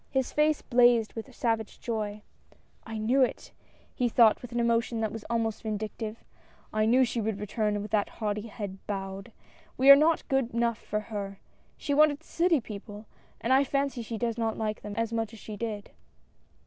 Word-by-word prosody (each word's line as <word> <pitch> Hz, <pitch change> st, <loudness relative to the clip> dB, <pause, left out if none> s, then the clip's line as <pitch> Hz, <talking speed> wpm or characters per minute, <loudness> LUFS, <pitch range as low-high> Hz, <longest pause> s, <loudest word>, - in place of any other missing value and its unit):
His 265 Hz, -2 st, 0 dB
face 300 Hz, 0 st, +2 dB
blazed 240 Hz, -3 st, +4 dB
with 225 Hz, +2 st, -6 dB
a -, -, -14 dB
savage 225 Hz, -3 st, -2 dB
joy. 215 Hz, -2 st, -3 dB, 0.3 s
" -, -, -22 dB, 0.3 s
I 225 Hz, 0 st, -5 dB
knew 235 Hz, +6 st, +2 dB
it! 255 Hz, -, 0 dB, 0.2 s
" -, -, -32 dB
he 245 Hz, -2 st, 0 dB
thought 225 Hz, -2 st, +5 dB
with 245 Hz, -, -9 dB
an 240 Hz, -, -1 dB
emotion 235 Hz, 0 st, +1 dB
that 220 Hz, -2 st, -1 dB
was 225 Hz, 0 st, -7 dB
almost 225 Hz, -2 st, -1 dB
vindictive, 215 Hz, +1 st, -5 dB, 0.2 s
" -, -, -31 dB
I 215 Hz, 0 st, +2 dB
knew 255 Hz, +3 st, +5 dB
she 235 Hz, -1 st, -2 dB
would 215 Hz, -1 st, -2 dB
return 210 Hz, 0 st, -1 dB
with 210 Hz, -, -8 dB
that 210 Hz, -2 st, +1 dB
haughty 210 Hz, 0 st, -2 dB
head 200 Hz, -3 st, -6 dB
bowed. 195 Hz, +2 st, -5 dB, 0.5 s
We 265 Hz, +2 st, +5 dB
were 275 Hz, -, +13 dB
not 310 Hz, +3 st, +2 dB
good 270 Hz, -4 st, 0 dB
enough 235 Hz, -1 st, +1 dB
for 210 Hz, -, -3 dB
her 200 Hz, -1 st, -4 dB, 0.2 s
— -, -, -37 dB
she 285 Hz, -, -2 dB
wanted 300 Hz, +1 st, +4 dB
city 335 Hz, -1 st, +2 dB
people, 210 Hz, -1 st, -9 dB, 0.4 s
and 245 Hz, -, +2 dB
I 270 Hz, +1 st, +5 dB
fancy 275 Hz, -2 st, -1 dB
she 225 Hz, 0 st, -5 dB
does 235 Hz, 0 st, -2 dB
not 225 Hz, -1 st, -1 dB
like 215 Hz, -1 st, -2 dB
them, 205 Hz, 0 st, -7 dB
as 230 Hz, 0 st, -1 dB
much 225 Hz, -1 st, -2 dB
as 225 Hz, -, -11 dB
she 215 Hz, -, -8 dB
did." 210 Hz, -1 st, -5 dB
225 Hz, 205 wpm, -28 LUFS, 215-245 Hz, 0.5 s, were